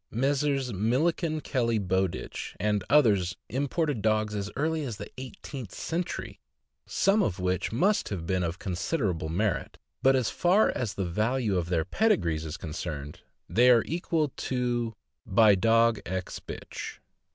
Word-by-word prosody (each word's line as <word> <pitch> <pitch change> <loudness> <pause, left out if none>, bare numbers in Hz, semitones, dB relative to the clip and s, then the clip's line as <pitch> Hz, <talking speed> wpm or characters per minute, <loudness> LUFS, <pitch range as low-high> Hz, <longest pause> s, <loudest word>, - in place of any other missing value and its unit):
Messrs. 135 0 0
Milliken, 155 - +1
Kelly, 115 -5 0
Bow 95 -1 +1
ditch, 85 - -7
and 105 -2 +1
others 105 -11 +4
imported 140 0 -1
dogs 110 0 +1
as 100 -1 -3
early 155 +2 0
as 120 -7 -4
the - - -8
eighteenth 130 -3 -8
century, 175 +2 -4 0.5
some 200 +2 +3
of 100 - 0
which 90 0 -1
must 190 - +2
have 90 -5 -4
been 95 +1 0
of 85 +1 -2
considerable 90 - -2
merit; 95 +3 -1 0.2
but 135 0 +5
as 130 -4 +1
far 185 +5 +3
as 115 -5 -3
the 95 - -1
value 110 +4 0
of 85 -2 -1
their 80 -3 +1
pedigrees 85 - +1
is 80 +1 -5
con 80 - -7
cerned, 75 -3 -5 0.3
they 125 +3 +4
are 120 -3 +6
equal 165 -2 -1
to 120 -3 -1 0.3
uBy 105 -1 +6
dog 115 -1 +4
ex 95 0 -4
bitch." - - -7
115 Hz, 150 wpm, -28 LUFS, 95-135 Hz, 0.5 s, are